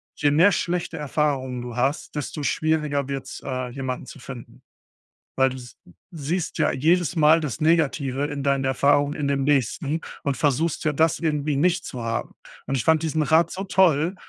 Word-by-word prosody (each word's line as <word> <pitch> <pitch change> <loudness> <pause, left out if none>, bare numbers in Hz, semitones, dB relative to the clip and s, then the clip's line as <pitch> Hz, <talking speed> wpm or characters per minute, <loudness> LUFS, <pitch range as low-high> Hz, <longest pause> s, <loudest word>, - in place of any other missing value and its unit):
„Je 145 -1 +2
mehr 170 +7 +5
schlechte 175 -2 -2
Erfahrungen 140 -4 -1
du 120 -1 -7
hast, 135 +5 -1
desto 150 +1 -4
schwieriger 150 -2 0
wird's, 135 -1 -5
äh, 130 -2 -3
jemanden 130 -1 -4
zu - - -11
finden." 125 -2 -10 0.8
Weil 135 0 +4
du 130 - -7
s 120 -1 -12 0.4
siehst 165 +2 -3
ja - - +3
jedes 170 +4 +1
Mal 155 +1 +5
das 150 -2 -4
Negative 145 -4 +1
in 145 -1 -5
deinen 140 -1 +1
Erfahrungen 145 +2 +2
in 150 - -3
dem 140 -1 0
Nächsten 145 +3 0 0.2
und 140 -2 0
versuchst 150 +4 0
ja, 155 - +2
das 160 +2 +2
irgendwie 150 -3 0
nicht 175 +5 +1
zu 120 -2 -6
haben. 115 0 -3 0.3
Und 135 - 0
ich 120 - -2
fand 160 -1 +3
diesen 160 -1 0
Rat 160 +3 +3
so 190 +1 -4
toll, 180 -3 +3
145 Hz, 180 wpm, -24 LUFS, 135-160 Hz, 0.8 s, mehr